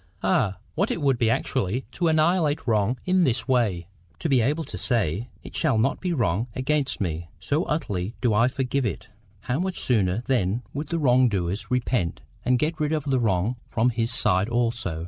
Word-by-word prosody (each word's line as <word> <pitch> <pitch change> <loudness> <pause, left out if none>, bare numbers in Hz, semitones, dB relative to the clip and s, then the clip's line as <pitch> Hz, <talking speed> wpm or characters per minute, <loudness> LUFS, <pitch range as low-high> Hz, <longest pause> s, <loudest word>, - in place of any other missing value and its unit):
Ah, 95 0 +2 0.2
what - - 0
it - - -1
would 135 -5 +1
be 115 - +3
actually 125 -1 -1
to 170 +4 -1
annihilate 160 -1 +2
wrong 110 +1 +1
in 185 0 +3
this 130 -6 0
way!—to 95 - -2
be 135 -5 +3
able 150 +8 0
to - - -8
say, 115 - 0
it - - -10
shall - - +2
not 115 +5 +1
be 180 - -1
wrong 115 - 0
against 135 +1 0
me, 85 -3 -3
so 150 +4 0
utterly 105 - -2
do 120 -4 +1
I 115 +4 +4
forgive 130 +1 -1
it! 105 - -6 0.3
How 125 +6 -2
much 185 0 -2
sooner, 105 -2 +1
then, 120 -2 0
would 145 +2 -4
the 170 - -2
wrong 130 -4 +4
doer 90 -4 -1 0.2
repent, 125 -8 -1 0.2
and 125 0 +3
get 160 +4 -1
rid 150 0 0
of 155 -2 0
the 135 -2 +1
wrong 110 +1 0
from 120 +2 +1
his 115 +1 -1
side 100 -3 +3
also! 115 -8 -1
125 Hz, 190 wpm, -25 LUFS, 105-140 Hz, 0.3 s, I